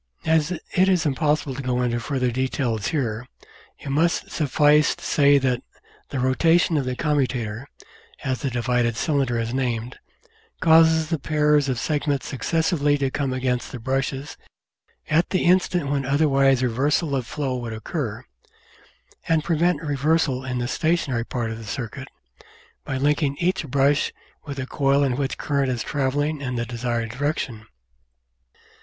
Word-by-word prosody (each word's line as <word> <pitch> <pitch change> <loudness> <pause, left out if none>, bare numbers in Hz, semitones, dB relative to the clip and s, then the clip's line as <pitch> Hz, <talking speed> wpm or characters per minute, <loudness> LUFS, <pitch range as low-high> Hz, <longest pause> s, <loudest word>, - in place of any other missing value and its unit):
As 160 -1 +2
it 185 +2 0
is 180 -4 +2
impossible 145 0 0
to 135 - -5
go 125 -1 0
into 120 -1 0
further 125 -1 -1
details 120 -4 -1
here, 125 -6 -2 0.5
it 140 - -8
must 160 +5 +1
suffice 150 0 +3
to - - -15
say 145 -1 +4
that 130 -3 0 0.5
the 140 - -4
rotation 165 +7 +3
of 140 -3 +1
the 130 0 -2
commutator, 130 -5 -1 0.6
as 130 -4 -2
the 140 - -1
divided 120 -1 0
cylinder 135 -6 0
is 115 +1 -2
named, 125 -2 -2 0.6
causes 160 -1 +5
the 165 -3 -1
pairs 150 -1 +2
of 130 - -1
segments 145 +1 -1
successively 150 0 +1
to 135 -2 -1
come 140 -1 -1
against 130 -1 -1
the - - -6
brushes 135 +3 -3 0.7
at 160 +3 +2
the 185 - 0
instant 180 -3 +2
when 140 -1 0
otherwise 135 -2 +3
reversal 140 +5 +1
of 125 -3 -2
flow 140 -4 -2
would 120 -2 -4
occur, 110 -1 -4 1.0
and 160 -2 +2
prevent 165 -1 +1
reversal 145 -2 +1
in 130 -1 -3
the 120 0 -1
stationary 145 -5 0
part 120 -3 -3
of 115 - -6
the - - -9
circuit 125 +4 -5 0.8
by 135 - -3
linking 140 0 +1
each 180 -2 0
brush 140 +2 +2 0.3
with 140 -1 -6
a 130 - -3
coil 140 +1 +2
in 130 -3 +1
which 135 0 -2
current 140 -2 0
is 120 -3 -2
travelling 145 +2 -1
in 125 -2 -3
the 120 0 -1
desired 120 -1 -3
direction. 125 -4 -3
135 Hz, 155 wpm, -23 LUFS, 125-150 Hz, 1.0 s, causes